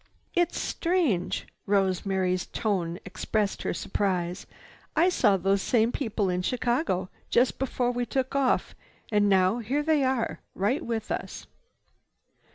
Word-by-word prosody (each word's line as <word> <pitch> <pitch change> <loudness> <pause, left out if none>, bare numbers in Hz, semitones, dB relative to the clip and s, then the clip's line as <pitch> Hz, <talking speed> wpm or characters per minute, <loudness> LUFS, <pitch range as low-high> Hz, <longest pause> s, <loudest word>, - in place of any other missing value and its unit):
"It's 350 -1 +1
strange!" 330 - 0 0.2
Rosemary's 190 -2 +1
tone 180 -6 -1
expressed 205 +2 -1
her - - -1
surprise. 180 -3 -2 0.5
"I 335 +4 +5
saw 205 - +3
those 195 +2 +1
same 230 +1 +2
people 220 -7 -1
in 180 0 0
Chicago, 240 - 0 0.2
just 245 +2 +2
before 250 -2 0
we 245 0 -2
took 260 -1 -1
off. 270 -2 +1 0.4
And 205 -1 +3
now, 190 +3 +3
here 265 +6 -1
they 310 -2 +3
are 260 -3 0 0.2
right 210 +10 0
with 225 -2 -3
us." - - -4
215 Hz, 130 wpm, -27 LUFS, 190-260 Hz, 0.5 s, I